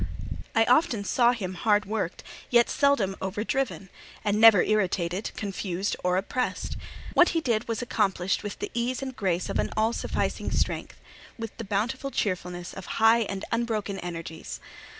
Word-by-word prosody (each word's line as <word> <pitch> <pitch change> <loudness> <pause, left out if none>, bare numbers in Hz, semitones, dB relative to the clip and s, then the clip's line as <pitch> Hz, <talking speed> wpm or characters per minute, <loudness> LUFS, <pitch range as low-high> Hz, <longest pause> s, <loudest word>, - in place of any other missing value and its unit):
I 225 0 +5
often 245 -5 +3
saw 240 +4 +4
him 195 -7 -3
hard 210 +3 +2
worked, 205 -4 -3 0.3
yet 240 -1 +4
seldom 260 -10 +2
over 190 +2 -2
driven, 230 -7 -2 0.3
and 210 0 +2
never 225 -5 +9
irritated, 190 -2 0
confused, 195 -1 -2
or 180 0 +2
oppressed. 250 +6 -2 0.4
What 355 - +6
he - - +4
did 235 -7 0
was 230 +1 -2
accomplished 195 -5 0
with 205 -1 -5
the - - -5
ease 245 +3 -1
and 260 -1 -5
grace 185 -5 0
of - - -2 0.2
all 220 +2 +2
sufficing - - -2
strength; - - -2 0.4
with 225 -2 -6
the 230 - -5
bountiful 225 +7 -1
cheerfulness 180 -7 -2
of 190 - -8
high 225 +1 +6
and 195 -3 -3
unbroken 220 -4 -1
energies. 165 -2 -6
210 Hz, 155 wpm, -27 LUFS, 190-235 Hz, 0.4 s, never